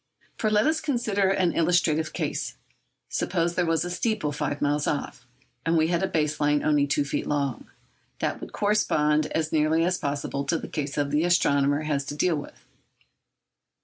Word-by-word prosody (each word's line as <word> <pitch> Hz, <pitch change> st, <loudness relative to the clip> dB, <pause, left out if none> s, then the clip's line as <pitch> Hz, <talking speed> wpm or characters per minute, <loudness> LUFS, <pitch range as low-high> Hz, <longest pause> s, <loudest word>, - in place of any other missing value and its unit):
For 215 Hz, -, 0 dB
let 210 Hz, +1 st, +3 dB
us 315 Hz, +1 st, +1 dB
consider 230 Hz, -9 st, 0 dB
an 185 Hz, -3 st, +2 dB
illustrative 160 Hz, -2 st, +2 dB
case. -, -, -3 dB, 0.5 s
Suppose 170 Hz, +1 st, -1 dB
there 175 Hz, -1 st, 0 dB
was 165 Hz, 0 st, +1 dB
a 175 Hz, -, -4 dB
steeple 180 Hz, -4 st, -1 dB
five 145 Hz, 0 st, -3 dB
miles 145 Hz, 0 st, 0 dB
off, 125 Hz, -4 st, -3 dB, 0.4 s
and 165 Hz, 0 st, +2 dB
we 160 Hz, 0 st, +3 dB
had 170 Hz, -1 st, +1 dB
a 190 Hz, -, +1 dB
base 155 Hz, -4 st, -1 dB
line 145 Hz, 0 st, +2 dB
only 145 Hz, -2 st, +3 dB
two 145 Hz, 0 st, +1 dB
feet 140 Hz, -, -3 dB
long. 140 Hz, -4 st, -2 dB, 0.5 s
That -, -, -2 dB
would -, -, -8 dB
correspond 155 Hz, -8 st, +2 dB
as 160 Hz, -1 st, -2 dB
nearly 160 Hz, +1 st, +2 dB
as 180 Hz, +1 st, 0 dB
possible 140 Hz, 0 st, -2 dB
to 165 Hz, +4 st, +1 dB
the -, -, -7 dB
case 145 Hz, -2 st, -4 dB
the 145 Hz, +1 st, +1 dB
astronomer 145 Hz, -4 st, +2 dB
has 145 Hz, -2 st, -1 dB
to 145 Hz, -, -5 dB
deal 165 Hz, +3 st, +2 dB
with. 145 Hz, -, -9 dB
155 Hz, 180 wpm, -26 LUFS, 145-175 Hz, 0.5 s, let